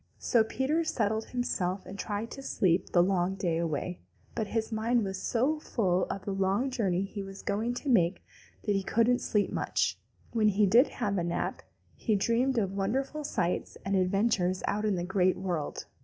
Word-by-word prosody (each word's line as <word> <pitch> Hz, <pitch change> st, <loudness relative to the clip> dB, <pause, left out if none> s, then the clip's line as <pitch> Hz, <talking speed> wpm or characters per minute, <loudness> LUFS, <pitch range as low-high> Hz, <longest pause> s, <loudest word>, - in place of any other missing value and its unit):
So 235 Hz, -3 st, +3 dB
Peter 270 Hz, +8 st, 0 dB
settled 220 Hz, -7 st, 0 dB
himself 195 Hz, -7 st, -2 dB
and 200 Hz, +1 st, -9 dB
tried 215 Hz, +2 st, -3 dB
to 275 Hz, -, -7 dB
sleep 185 Hz, -9 st, +1 dB
the 175 Hz, -, +5 dB
long 185 Hz, 0 st, +1 dB
day 175 Hz, -4 st, 0 dB
away, 170 Hz, +2 st, -2 dB, 0.3 s
but 220 Hz, -3 st, -2 dB
his 225 Hz, +1 st, -2 dB
mind 225 Hz, +2 st, +1 dB
was 190 Hz, -1 st, -4 dB
so 270 Hz, +7 st, +1 dB
full 185 Hz, -10 st, +1 dB
of 195 Hz, -1 st, -5 dB
the 200 Hz, -, -2 dB
long 195 Hz, +7 st, +1 dB
journey 195 Hz, -7 st, 0 dB
he 200 Hz, +1 st, -5 dB
was 195 Hz, 0 st, -9 dB
going 225 Hz, +4 st, -1 dB
to 285 Hz, -, -6 dB
make 185 Hz, -8 st, +3 dB, 0.4 s
that 210 Hz, -, +1 dB
he 195 Hz, -, +1 dB
couldn't 230 Hz, +5 st, +2 dB
sleep 210 Hz, -2 st, +1 dB
much, -, -, 0 dB, 0.3 s
and 230 Hz, -, -2 dB
when 215 Hz, -, +5 dB
he 210 Hz, 0 st, +4 dB
did 235 Hz, +8 st, +6 dB
have 200 Hz, -2 st, -2 dB
a -, -, -1 dB
nap, 170 Hz, 0 st, -2 dB, 0.3 s
he 220 Hz, -, 0 dB
dreamed 235 Hz, +6 st, +1 dB
of 195 Hz, -4 st, +1 dB
wonderful 265 Hz, +10 st, -1 dB
sights 180 Hz, -11 st, -2 dB
and 195 Hz, 0 st, 0 dB
adventures 185 Hz, -1 st, +1 dB
out 210 Hz, +1 st, 0 dB
in 210 Hz, -2 st, +2 dB
the 175 Hz, -, -2 dB
Great 185 Hz, 0 st, +2 dB
World. 175 Hz, -6 st, -3 dB
200 Hz, 190 wpm, -30 LUFS, 185-230 Hz, 0.4 s, did